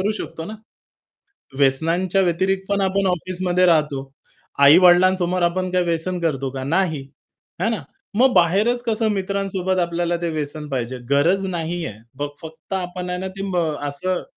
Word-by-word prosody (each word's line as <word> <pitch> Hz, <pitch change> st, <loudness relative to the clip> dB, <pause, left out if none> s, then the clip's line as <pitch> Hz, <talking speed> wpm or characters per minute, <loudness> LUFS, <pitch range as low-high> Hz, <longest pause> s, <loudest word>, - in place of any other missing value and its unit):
करू 200 Hz, +3 st, +1 dB
शकतो 160 Hz, -, -6 dB
ना? 215 Hz, -, -6 dB, 1.1 s
व्यसनांच्या 165 Hz, +8 st, +2 dB
व्यतिरिक्त 190 Hz, +2 st, 0 dB
पण 200 Hz, 0 st, +1 dB
आपण 195 Hz, 0 st, +1 dB
ऑफिसमध्ये 180 Hz, 0 st, 0 dB
राहतो. 150 Hz, -5 st, +1 dB, 0.5 s
आई-वडिलांसमोर 180 Hz, +4 st, +5 dB
आपण 185 Hz, +2 st, 0 dB
काय 180 Hz, -1 st, +2 dB
व्यसन 175 Hz, +1 st, -2 dB
करतो 140 Hz, -5 st, -1 dB
का? 135 Hz, 0 st, -5 dB
नाही. 160 Hz, 0 st, 0 dB, 0.6 s
है -, -, +2 dB
ना? -, -, -2 dB, 0.3 s
मग 255 Hz, +3 st, +4 dB
बाहेरच 210 Hz, +8 st, +3 dB
कसं 225 Hz, -1 st, 0 dB
मित्रांसोबत 190 Hz, -1 st, -1 dB
आपल्याला 175 Hz, 0 st, 0 dB
ते 170 Hz, -, -1 dB
व्यसन 150 Hz, 0 st, -4 dB
पाहिजे? 130 Hz, -2 st, -3 dB
गरज 170 Hz, +8 st, +3 dB
नाहीये! 170 Hz, -, -3 dB, 0.3 s
मग 145 Hz, -, -1 dB
फक्त 160 Hz, +3 st, -9 dB
आपण 180 Hz, -1 st, -4 dB
आहे 180 Hz, 0 st, -2 dB
ना 190 Hz, -, -3 dB
ते 195 Hz, -, -4 dB
म 180 Hz, -, -1 dB, 0.3 s
असं 180 Hz, +6 st, -2 dB
180 Hz, 150 wpm, -21 LUFS, 160-190 Hz, 1.1 s, आई-वडिलांसमोर